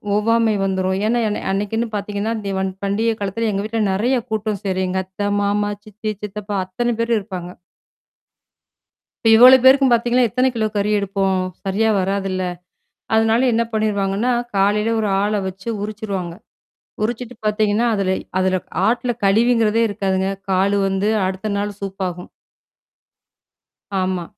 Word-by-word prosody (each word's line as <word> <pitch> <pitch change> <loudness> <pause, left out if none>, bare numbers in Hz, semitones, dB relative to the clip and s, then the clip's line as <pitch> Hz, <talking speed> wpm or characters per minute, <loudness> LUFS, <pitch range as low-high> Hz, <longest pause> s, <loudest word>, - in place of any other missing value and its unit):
ஒவ்வாமை 225 +1 +2
வந்துரும். 190 -1 0
ஏன்னா 240 +1 +1
என்ன 210 - -3
அன்னைக்குன்னு 210 +4 -1
பார்த்தீங்கன்னா, 205 +2 -2
தீவன் 190 -1 -1
பண்டிகை 220 +3 +1
காலத்தில 205 +3 -1
எங்க 200 0 -2
வீட்ல 225 +1 -2
நிறைய 240 +7 +1
கூட்டம் 215 -2 -2
சேரும். 190 -1 -1
எங்க 190 +1 -1
அத்த, 195 +2 -3
மாமா, 205 +1 0
சித்தி, 215 +1 -5
சித்தப்பா 210 0 -4
அத்தனை 240 +6 -1
பேரும் 230 0 +1
இருப்பாங்க. 185 -3 -7 1.7
இப்ப - - +6
இவ்வளோ 255 +3 +9
பேருக்கும் 265 0 +6
பார்த்தீங்கன்னா, 240 +1 +3
எத்தனை 250 +4 +1
கிலோ 220 -2 0
கறி 205 +1 +1
எடுப்போம். 195 -1 0 0.2
சரியா 205 +3 +1
வராதுல்ல? 190 0 -1 0.7
அதனால 225 +3 +3
என்ன 230 +1 +2
பண்ணிருவாங்கன்னா, 210 +1 0 0.2
காலையில 205 +3 +2
ஒரு 215 - 0 0.2
ஆள 210 +1 0
வச்சு 190 +3 -9
உரிச்சுருவாங்க. 205 -5 -4 0.7
உரிச்சுட்டு 240 +2 -4
பார்த்தீங்கன்னா, 215 +2 +2
அதுலை 190 -1 0 0.2
அதுல 185 0 +1 0.3
ஆட்ல 240 +1 0
கழிவுங்குறதே 225 +2 +3
இருக்காதுங்க. 190 -2 -1 0.2
கால் 195 +2 +2
வந்து 195 +2 0 0.2
அடுத்த 190 +3 -3
நாள் 205 0 -4
சூப்பாகும். 190 -2 -5 1.7
ஆமா. 185 -1 -1
205 Hz, 130 wpm, -20 LUFS, 195-225 Hz, 1.7 s, இவ்வளோ